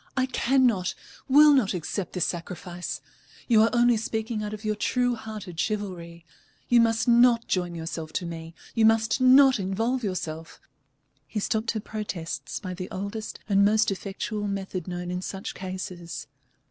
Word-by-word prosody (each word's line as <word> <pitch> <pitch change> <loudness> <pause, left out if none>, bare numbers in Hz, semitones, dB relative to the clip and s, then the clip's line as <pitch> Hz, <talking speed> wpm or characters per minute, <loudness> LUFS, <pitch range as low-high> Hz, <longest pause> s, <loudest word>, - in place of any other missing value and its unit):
"I 260 - +3
cannot, 250 -7 +2 0.3
will 295 +2 +8
not 220 -8 +2
accept 180 +3 -4
this 180 - +1
sacrifice. 175 +1 -5 0.5
You 225 -3 +5
are 225 - +5
only 240 -1 +4
speaking 220 0 -3
out 210 0 -4
of 215 0 -7
your 215 - +1
true 245 +3 +1
hearted 215 -7 -7
chivalry. 175 -6 -3 0.4
You 240 -1 +5
must 225 +1 +2
not 235 -1 +5
join 175 -2 -1
yourself 160 -1 -5
to 180 - -2
me, 165 -1 -7 0.2
you 225 - +2
must 225 +3 +3
not 260 -1 +7
involve 225 +7 -1
yourself 165 -5 -4 0.4
" 145 0 -44
He 215 - -3
stopped 220 +2 -1
her 220 - -2
protests 205 -6 -5
by 185 -3 -5
the 180 0 -6
oldest 200 +3 -5
and 200 -1 +4
most 215 +1 +3
effectual 205 +2 -4
method 190 -3 -4
known 175 0 -4
in 180 0 -3
such 190 +1 -5
cases. 185 -3 -6
205 Hz, 160 wpm, -26 LUFS, 180-230 Hz, 0.5 s, will